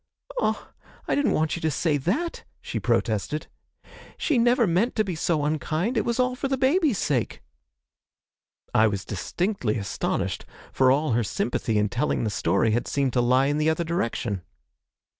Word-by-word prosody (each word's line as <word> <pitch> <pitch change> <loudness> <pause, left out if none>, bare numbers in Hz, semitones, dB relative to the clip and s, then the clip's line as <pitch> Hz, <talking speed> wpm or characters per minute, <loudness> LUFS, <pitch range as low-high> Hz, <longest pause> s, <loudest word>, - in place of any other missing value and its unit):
'Ah, - - -1 0.4
I - - +1
didn't 285 -1 +2
want 155 0 +1
you 170 - -6
to 160 - +1
say 155 0 +1
that!' 230 - -2 0.2
she - - -4
protested; 115 +7 0 0.7
'she 290 -6 +1
never 240 0 +4
meant 195 +7 +1
to 215 - +3
be 190 -3 -3
so 155 -2 0
unkind 155 - -1
it 220 - +1
was 235 +1 -1
all 250 0 +2
for 265 - -2
the 270 0 0
baby's 275 - +2
sake!' 130 -7 -1 1.3
I 110 +1 +5
was 100 -2 -3
distinctly 120 - -1
astonished, 100 -5 -2 0.3
for 130 -1 +4
all 145 +2 +2
her 115 +1 +2
sympathy 110 +1 -1
in 105 0 +2
telling 120 +6 -1
the 110 - -1
story 100 +3 +1
had 120 +3 0
seemed 135 -3 0
to 125 - +3
lie 130 +2 +3
in 145 +2 0
the 155 +1 +3
other 160 +2 0
direction. 115 - -2
155 Hz, 175 wpm, -25 LUFS, -, 1.3 s, I